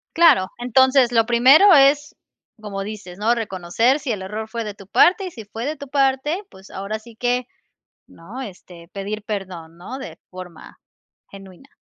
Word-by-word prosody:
Claro, 315 - +5
entonces 260 +1 +3
lo 225 -1 +3
primero 265 - +6
es 290 +1 +4 0.5
como 200 -2 -5
dices, 200 -3 -9
¿no? 225 +3 +2
Reconocer, 225 - 0
si 270 -2 -5
el 205 -4 -3
error 215 +3 -6
fue 230 0 -5
de 210 - -6
tu 195 -1 -15
parte. 375 - +4
Y - - -6
si 230 -9 -11
fue 220 +3 -7
de 305 +2 -3
tu 280 -1 -10
parte, 275 +6 0
pues 190 +1 -16
ahora 200 +3 -5
sí 230 +1 -16
que 245 +1 -1 0.6
¿no? 205 +11 -11
Este, 180 -6 -11
pedir 205 +2 -5
perdón, 185 -6 -7
¿no?, 215 +9 -8
de 270 - -9
forma 180 -2 -12 0.5
genuina. 195 +6 -15
225 Hz, 170 wpm, -21 LUFS, 195-265 Hz, 0.6 s, primero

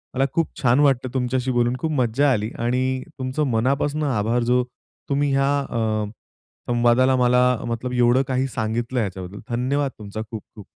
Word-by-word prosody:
मला 135 +1 +2
खूप 165 -1 +1
छान 125 0 +4
वाटतं 135 -3 +3
तुमच्याशी 130 0 0
बोलून 120 0 +1
खूप 160 - -2
मज्जा 135 0 +2
आली 110 -3 0
आणि 130 +2 0 0.2
तुमचं 130 +3 -1
मनापासून 140 +6 0
आभार 120 -3 +1
जो 125 +1 +2 0.5
तुम्ही 140 0 +1
ह्या 135 0 +2
अ, 140 - -6 0.9
संवादाला 120 +2 +3
मला 125 0 +3 0.3
मतलब 120 +2 -3
एवढं 125 +1 +4
काही 130 0 0
सांगितलं 120 +1 -2
ह्याच्याबद्दल 95 -2 -4
धन्यवाद 135 +4 0
तुमचा 105 +1 -6
खूप 110 -3 -6
खूप. 105 -3 -11
125 Hz, 155 wpm, -22 LUFS, 120-135 Hz, 0.9 s, छान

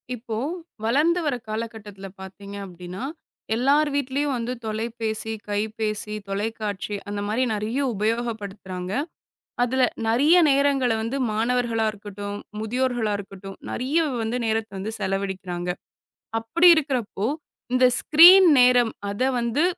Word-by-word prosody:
இப்போ 225 -1 -6 0.5
வளர்ந்து 305 +9 +3
வர 285 -4 +1
காலகட்டத்துல 215 -3 -6
பாத்தீங்க 200 +1 -10
அப்பிடின்னா 180 +3 -8 0.5
எல்லார் 285 +5 +3
வீட்லயும் 280 +1 0
வந்து 240 +1 -3
தொலைபேசி, 220 0 -3 0.2
கைபேசி, 215 0 -2
தொலைக்காட்சி 205 0 -3
அந்த 205 0 -3
மாதிரி 225 +5 +1
நிறைய 215 +4 -2 0.2
உபயோகப்படுத்துறாங்க. 205 -4 -3 0.7
அதுல 255 +2 +1 0.2
நிறைய 265 +9 +4
நேரங்கள 275 -2 +3
வந்து 230 +5 -3 0.2
மாணவர்களாக 230 0 +1
இருக்கட்டும், 205 -1 -7 0.2
முதியோர்களா 240 -1 0
இருக்கட்டும், 195 -1 -9
நிறைய 270 +6 0 0.2
வந்து 225 +3 -2
நேரத்த 220 -1 -1
வந்து 205 +4 -4
செலவழிக்கிறாங்க. 190 -3 -3 0.7
அப்பிடி 335 +11 +4
இருக்கிறப்போ, 255 -9 -1 0.5
இந்த 255 0 +5
ஸ்கிரீன் 350 +4 +8
நேரம் 245 -2 +5 0.2
அத 205 - -6 0.2
வந்து 235 +6 0
225 Hz, 110 wpm, -24 LUFS, 205-250 Hz, 0.7 s, ஸ்கிரீன்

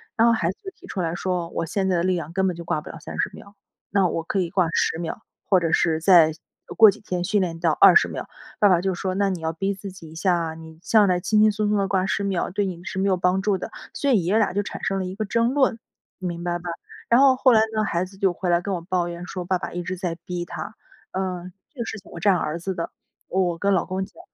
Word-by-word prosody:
然 230 0 +4
后 235 - +5
孩 170 -6 0
子 190 - -5
就 385 - -6
提 - - -16
出 190 - -3
来 165 -1 -1
说： 175 -1 -2
“我 165 - -1
现 190 +4 -1
在 180 -2 +2
的 170 - 0
力 185 0 +2
量 165 -1 -5
根 190 0 +1
本 180 - -1
就 170 - -7
挂 150 - -1
不 - - -11
了 165 - -8
30 - - -3
秒， 200 - -13 0.4
那 195 -2 +3
我 165 -1 -2
可 195 - -1
以 175 -3 0
挂 185 -2 +2
10 - - +1
秒， 170 +5 -5 0.3
或 190 -3 +5
者 165 -1 -1
是 160 -1 +2
再 170 -3 +6 0.4
过 220 -1 +9
几 195 - -3
天 180 -4 -3
训 205 +3 +1
练 170 -3 -2
到 165 -2 +2
20 430 - +7
秒。 - - -6 0.3
“爸 205 - +6
爸 180 -3 +4
就 190 -1 -1
说： 185 +1 -2
“那 200 0 +2
你 180 -3 -3
要 160 0 -2
逼 195 +5 -2
自 195 0 -8
己 165 -4 -12
一 - - -12
下 180 +1 +2
啊。 165 -2 -2
你 160 0 -12
上 205 +1 +4
来 180 -1 +2
轻 215 +4 +1
轻 215 0 +6
松 210 0 -1
松 210 - +2
地 195 -1 +1
挂 190 0 +1
10 205 - -1
秒 195 -3 -1
对 205 +2 -1
你 175 -2 -5
是 190 -1 -6
没 195 - +1
有 185 - +3
帮 180 +1 +1
助 205 -2 +2
的。 - - -6 0.2
“所 285 - -1
以 195 -8 +3
爷 205 +5 +3
俩 210 - +1
就 205 +2 0
产 - - -7
生 195 - 0
了 190 - -2
一 185 - -5
个 215 - -2
争 230 +4 +1
论， 265 -5 +2 0.4
明 175 -2 -5
白 175 0 -1
吧？ 175 0 -7 0.4
然 240 +3 +6
后 270 -2 +6
后 255 -1 +4
来 220 - +6
呢 215 - +2
孩 170 -2 0
子 195 +1 -15
就 190 -2 +2
回 180 +1 -3
来 170 0 +4
跟 195 +1 -3
我 175 - -3
抱 175 0 -1
怨 175 +1 -7
说： 180 -2 -5
“爸 185 0 0
爸 - - -5
一 175 0 -4
直 185 +1 -4
在 175 -2 -3
逼 175 -1 -4
他。 220 - -7 0.4
“嗯， 185 -1 -4 0.2
这 280 - -18
个 - - -2
事 220 - -5
情 190 - -18
我 170 - -8
站 195 +1 +4
儿 155 +1 -2
子 190 +2 -3
的， 165 - -3 0.4
我 180 -2 0
跟 200 0 +1
老 180 - +1
公 190 +1 -2
讲， - - -19
185 Hz, 300 characters per minute, -23 LUFS, 175-200 Hz, 0.4 s, 过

